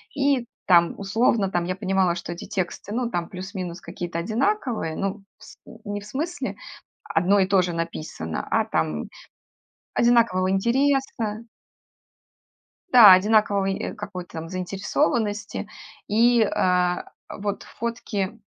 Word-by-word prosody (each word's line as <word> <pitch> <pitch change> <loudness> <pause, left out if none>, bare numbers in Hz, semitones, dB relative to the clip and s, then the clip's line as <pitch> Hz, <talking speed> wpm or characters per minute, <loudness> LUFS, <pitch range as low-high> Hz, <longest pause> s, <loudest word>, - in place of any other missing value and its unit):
И 275 -3 +2 0.2
там, 170 -2 +5
условно, 205 0 +1
там 175 -2 0
я 185 +1 -2
понимала, 190 -3 +1
что 175 0 -6
эти 170 - -9
тексты, 195 0 -4
ну, 250 0 0
там 175 -1 -2
плюс-минус 185 -2 -6
какие-то 175 -1 -6
одинаковые, 230 - -1
ну, 195 +1 -3 0.2
с - - -14 0.3
не 205 0 -4
в 205 - -12
смысле 315 +10 -3 0.5
одно 185 +5 +2
и 190 - +3
то 195 -1 +4
же 175 -1 -2
написано, 155 - -4
а - - +2
там 75 -2 -2 0.9
одинакового 230 -6 +3
интереса 235 0 0 1.5
Да, 220 -6 +10
одинакового 200 0 +4
и 195 0 -2
какой-то 180 -6 -7
заинтересованности 205 - -1 0.4
и, 230 +2 +4
а, 180 -3 +1 0.2
а - - -8
вот 205 0 -3
фотки, 230 -3 -4
195 Hz, 125 wpm, -24 LUFS, 180-225 Hz, 1.5 s, Да